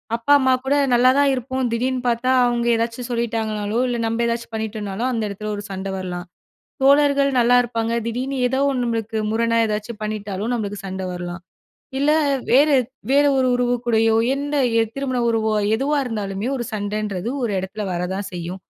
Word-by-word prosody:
அப்பா, 230 +4 -1
அம்மா 260 -1 +3
கூட 275 +2 +2 0.2
நல்லா 245 +1 +5
தான் 285 -1 +4
இருப்போம். 260 0 -2
திடீர்னு 250 +2 -1
பார்த்தா, 240 +2 +1
அவங்க 240 -1 0
ஏதாச்சும் 230 +2 -3
சொல்லிட்டாங்கன்னாலோ, 220 -2 -2
இல்ல 245 -1 -1
நம்ம 230 +1 -1
ஏதாச்சும் 235 0 -3
பண்ணிட்டோம்னாலோ, 215 0 -3
அந்த 230 -2 -1
எடத்ல 210 +2 -6
ஒரு 205 - -6
சண்ட 195 0 -4
வரலாம். 180 -1 -5 0.6
தோழர்கள் 280 0 +4
நல்லாருப்பாங்க 235 -1 +2
திடீர்னு 255 +4 -3
ஏதோ 265 +2 -1
ஒன்னு 255 -3 -1
நம்மளுக்கு 225 -1 -2
முரணா 230 +1 +1
ஏதாச்சும் 215 +1 -4
பண்ணிட்டாலும், 210 0 -3
நம்மளுக்கு 205 -3 -3
சண்ட 190 0 -5
வரலாம், 175 0 -6 0.6
இல்ல 285 +2 +3 0.4
வேற 275 +5 +6 0.4
வேற 285 +1 +5
ஒரு 260 -1 +2
உறவுக்கூடயோ, 240 -2 +2 0.2
எந்த 285 +1 -3 0.4
திருமண 265 -2 -2
உறவோ 220 -1 +1 0.2
எதுவா 285 +4 0
இருந்தாலுமே, 210 -1 -3
ஒரு 240 - -3
சண்டைன்றது 205 -1 -3
ஒரு 225 -4 -1
எடத்ல 190 +3 -5
வர 175 - -2
தான் 195 -1 -4
செய்யும். 175 +2 -6
230 Hz, 155 wpm, -21 LUFS, 210-250 Hz, 0.6 s, வேற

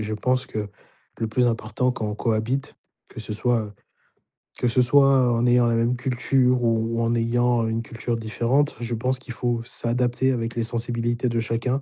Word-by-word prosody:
je 110 0 -3
pense 125 +4 0
que 105 -1 -4 0.5
le 115 - -1
plus 125 +2 +1
important 115 +2 0
quand 110 - -4
on 105 - -3
cohabite, 115 +5 -1 0.3
que 115 - -9
ce 110 - -5
soit 115 +2 +1
heu, 105 - -12 0.9
que 125 - +1
ce 125 +2 +3
soit 135 -1 +5
en 115 +1 +1
ayant 120 -1 +4
la 115 - +1
même 115 +2 +1
culture 125 0 +1
ou 115 0 0
en 115 0 +1
ayant 120 0 +1
une 115 +1 -2
culture 115 +1 -4
différente, 120 +6 0
je 120 0 -3
pense 130 +3 -1
qu'il 130 -1 -8
faut 120 -1 -1
s'adapter 125 +2 0
avec 115 -1 -3
les 115 - 0
sensibilités 120 +1 -1
de 115 - -1
chacun. 115 +4 -1
120 Hz, 190 wpm, -23 LUFS, 115-125 Hz, 0.9 s, soit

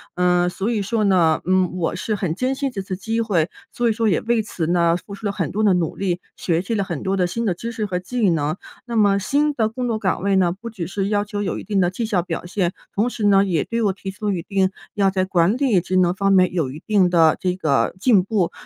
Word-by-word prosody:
呃， 180 0 +2
所 195 +5 -3
以 215 -3 0
说 215 +2 0
呢， 175 -5 +3
嗯， 185 -1 +2
我 170 0 -1
是 215 +3 -2
很 185 -5 -2
珍 255 +4 -1
惜 275 0 -1
这 200 -6 -5
次 190 -1 -5
机 225 +3 -2
会， 185 -6 +1 0.2
所 240 -1 0
以 - - +3
说 225 0 0
也 - - +2
为 235 -1 +1
此 170 -6 -4
呢， 170 -1 +2
付 200 +2 -11
出 205 +2 -9
了 200 - +1
很 - - -3
多 215 +2 -1
的 200 -3 +5
努 170 -3 -1
力， 180 -2 -1 0.2
学 170 -1 0
习 210 +5 -4
了 200 - +1
很 170 -7 -5
多 190 +1 0
的 180 -1 +2
新 230 +6 -3
的 190 - +1
知 230 +7 -6
识 220 -3 -3
和 180 -2 -2
技 215 +2 0
能。 155 -1 0 0.3
那 235 -1 -5
么 200 -2 +4
新 290 +7 +1
的 220 -5 +1
工 250 +2 -3
作 220 -2 -1
岗 190 -3 -1
位 200 -1 +2
呢， 175 -2 +3
不 230 +5 -8
只 180 -7 -5
是 195 +1 -2
要 205 -1 +1
求 205 -1 -4
有 185 - -2
一 - - -8
定 205 -2 0
的 175 - +2
绩 225 +5 -3
效 200 -5 +1
表 175 - -5
现， 180 -1 -1 0.2
同 220 +5 +1
时 220 -3 -3
呢， 200 -1 +5
也 170 -6 0
对 230 0 -2
我 200 - +3
提 195 0 -7
出 205 +1 -3
一 175 -3 -2
定 190 +1 0 0.2
要 195 -2 +2
在 185 -1 0
管 185 +3 +2
理 235 -11 +2
职 185 +1 -3
能 180 -1 +3
方 195 +1 +1
面 185 -1 +4
有 155 -7 -1
一 150 - -9
定 195 -4 +3
的 165 -3 +4
这 180 -1 0
个 155 -6 +1
进 205 -5 +4
步， 195 -4 0
195 Hz, 295 characters per minute, -21 LUFS, 180-215 Hz, 0.3 s, 的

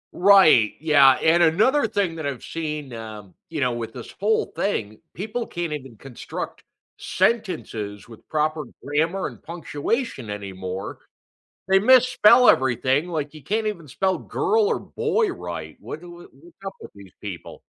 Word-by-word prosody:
Right, 180 - +6
yeah, 145 -4 +6
and 170 +2 +4
another 220 - +3
thing 200 -6 -1
that 155 -3 -3
I've 135 -4 -5
seen, 150 -5 -5
um, 105 -4 -9 0.2
you 160 -3 -4
know, 125 -1 +2
with 115 -1 -5
this 120 - -9
whole 215 +3 +2
thing, 110 - -2 0.2
people 220 +5 -4
can't 170 -3 -4
even 135 -5 -7
construct 135 0 -7 0.4
sentences 165 - -2
with 115 -2 -15
proper 155 -1 -1 0.2
grammar 160 +6 0
and - - -7
punctuation 165 - -3
anymore. 95 -2 -6 0.7
They 190 0 +5
misspell 250 0 +6
everything, 130 +5 +2
like, 150 -3 -3
you 150 -4 -12
can't 215 +5 -1
even 170 -9 -5
spell 190 +7 0
"girl" 430 0 +1
or 465 - 0
"boy" 445 -1 0
right, - - -7
what - - -7
do 175 0 -12
wha 175 0 -12
what's 160 +6 -19
up 195 - -4
with - - -11
these 100 -3 -14
people? 95 -5 -8
155 Hz, 155 wpm, -23 LUFS, 125-200 Hz, 0.7 s, Right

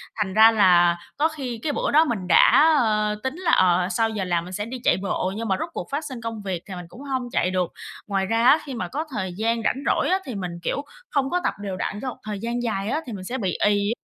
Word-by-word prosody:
Thành 205 -4 -2
ra 220 +1 +7
là 175 -5 +5 0.2
có 305 +3 +3
khi 260 -7 -6
cái 300 - 0
bữa - - -1
đó 310 +3 +5
mình 200 -9 -3
đã, 310 - +6
ơ, 215 -3 +1
tính 265 +2 -2
là, 360 0 0
ờ, 180 0 +4
sau 225 +1 +1
giờ 210 -3 -3
làm 175 -2 0
mình 180 +1 -9
sẽ 210 +2 -3
đi 255 +2 -6
chạy - - +3
bộ, 190 0 -1
nhưng 225 +1 -4
mà 190 - +2
rốt 335 - -3
cuộc - - -5
phát 295 +2 -2
sinh 255 -4 -7
công 225 -1 -5
việc 190 -4 -4
thì 190 - -7
mình 180 -1 -7
cũng 240 - -13
hông 260 -3 -3
chạy 185 - +1
được. 185 -2 -1 0.4
Ngoài 195 -2 0
ra 225 +4 +1
á 300 +5 +7
khi 275 - -6
mà 200 -7 -3
có 305 - -4
thời 190 -7 -3
gian 230 +1 0
rảnh 260 - 0
rỗi - - +1
á 375 - +2
thì 255 - -6
mình, 180 -3 -4
kiểu, 280 - -1 0.3
không 275 -2 0
có 360 - +1
tập - - 0
đều 195 -2 -4
đặn 205 +3 -3
cho 260 - -3
một - - -8
thời 210 -2 -5
gian 235 +3 -3
dài 210 -3 -2
á 305 +6 -1
thì 240 - -7
mình 190 -2 -7
sẽ 245 +7 -4
bị 190 -5 -2
ì. 205 0 +2
220 Hz, 280 wpm, -23 LUFS, 190-260 Hz, 0.4 s, ra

